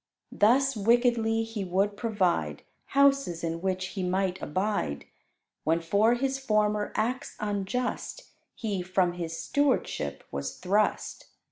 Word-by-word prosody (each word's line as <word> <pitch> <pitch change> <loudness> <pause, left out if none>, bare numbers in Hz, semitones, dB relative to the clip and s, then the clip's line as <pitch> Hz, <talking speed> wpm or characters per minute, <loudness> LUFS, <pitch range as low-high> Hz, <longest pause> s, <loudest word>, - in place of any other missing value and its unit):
Thus 265 +5 +3
wickedly 225 0 +2
he 225 -2 -4
would 195 +3 0
provide 205 -6 0 0.3
Houses 275 -12 +3
in 165 0 -2
which 185 -1 -1
he 195 - -5
might 185 0 0
abide, 185 - -2 0.6
When 165 +2 +2
for 205 +8 +3
his 270 +2 -1
former 210 -4 +1
acts 245 +4 -2
unjust 215 - -3 0.2
He 205 -5 -2
from 180 -1 +1
his 165 -2 -5
stewardship 260 - 0
was 70 0 -4
thrust. 205 +3 0
205 Hz, 120 wpm, -28 LUFS, 180-235 Hz, 0.6 s, Thus